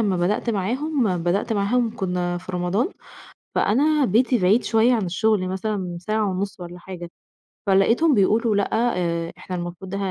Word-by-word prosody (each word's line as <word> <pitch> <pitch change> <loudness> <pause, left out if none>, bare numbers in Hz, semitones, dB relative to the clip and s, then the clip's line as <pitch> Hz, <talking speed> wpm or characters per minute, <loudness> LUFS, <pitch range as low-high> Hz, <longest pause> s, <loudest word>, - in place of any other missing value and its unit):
لمّا 200 -4 +1
بدأت 185 +7 0
معاهم 235 - 0
بدأت 195 +6 0
معاهم 225 +3 0
كنا 180 -2 -2
في 185 +1 -9
رمضان، 180 - 0 0.7
فأنا 290 +5 +3
بيتي 245 +5 +3
بعيد 195 +6 +3
شوية 225 +2 +3
عن 215 -5 0
الشغل، 185 +2 +1
مثلًا 190 -2 -3
ساعة 215 +1 0
ونُصّ 190 +1 -3
والَّا 175 0 -8
حاجة، 175 -1 -8 0.6
فلقيتهم 230 +11 +4
بيقولوا 215 +1 +2
لأ، 200 - +1 0.3
آآ، 170 -1 -2
إحنا 185 - -6
المفروض 180 +2 -6
ه - - -2
195 Hz, 155 wpm, -23 LUFS, 180-225 Hz, 0.7 s, فلقيتهم